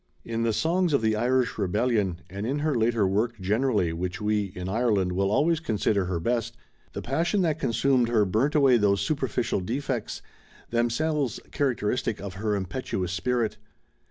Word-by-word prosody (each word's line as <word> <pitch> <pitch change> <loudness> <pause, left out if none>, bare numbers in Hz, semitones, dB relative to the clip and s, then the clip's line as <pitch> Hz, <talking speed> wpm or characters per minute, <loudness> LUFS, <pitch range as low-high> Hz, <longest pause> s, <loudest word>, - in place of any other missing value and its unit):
In 115 0 -2
the 115 0 +2
"Songs 170 - +1
of 140 - +2
the 110 0 +2
Irish 125 +1 +1
Rebellion" 100 -2 0
and 100 +4 -5
in 135 +3 -1
her 155 - +2
later 115 -3 +2
work 110 +4 0
generally 105 -2 +1
which 90 +3 -4
we, 105 -1 +1
in 90 0 -5
Ireland, 105 -3 +1
will 95 +2 +1
always 155 +9 +2
consider 105 - 0
her 90 -2 -2
best, 115 +4 -1 0.4
the - - -5
passion 170 - +1
that 160 -2 0
consumed 125 -1 +2
her 110 -3 +3
burnt 115 +11 +1
away 135 -4 +5
these 100 -2 +2
superficial 130 -7 -1
defects, 120 +3 -3 0.5
themselves 120 +3 0
characteristic 125 -4 -1
of 100 -2 -6
her 105 +2 -1
impetuous 95 -2 -3
spirit. 115 +3 -1
115 Hz, 160 wpm, -26 LUFS, 100-130 Hz, 0.5 s, away